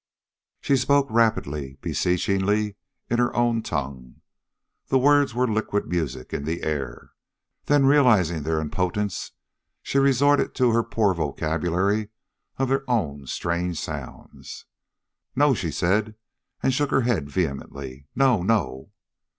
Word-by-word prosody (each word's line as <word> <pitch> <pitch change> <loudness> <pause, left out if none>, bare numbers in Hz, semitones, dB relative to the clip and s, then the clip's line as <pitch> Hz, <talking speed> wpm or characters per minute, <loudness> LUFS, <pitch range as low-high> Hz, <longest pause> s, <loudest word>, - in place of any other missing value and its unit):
She 140 - +2
spoke 140 +2 +3
rapidly, 75 -12 0
beseechingly, 100 +5 0 0.3
in 120 - 0
her 120 - +1
own 120 -1 +2
tongue. 65 - -5 0.7
The 135 - +3
words 145 -1 +3
were 125 +1 +2
liquid 110 -2 -1
music 70 -8 -3
in 70 - -3
the 80 +3 -3
air. 70 -6 -4 0.5
Then, 145 -2 +3
realizing 110 - +4
their 80 +1 -1
impotence, 90 +5 -2 0.5
she 140 - +1
resorted 140 +1 +3
to 125 -2 +3
her 115 +1 +3
poor 105 -4 +1
vocabulary 85 +7 -1 0.5
of 135 - 0
their 135 +1 +1
own 75 - -1
strange 85 +4 -2
sounds. - - -8 0.7
"No!" 145 +1 +4
she 95 -8 -2
said, 100 +7 0 0.5
and 130 - +2
shook 145 +2 0
her 135 - +2
head 115 - 0
vehemently. 70 -4 -4
"No 130 -6 +3
no!" 90 -10 -1
100 Hz, 125 wpm, -24 LUFS, 80-125 Hz, 0.7 s, realizing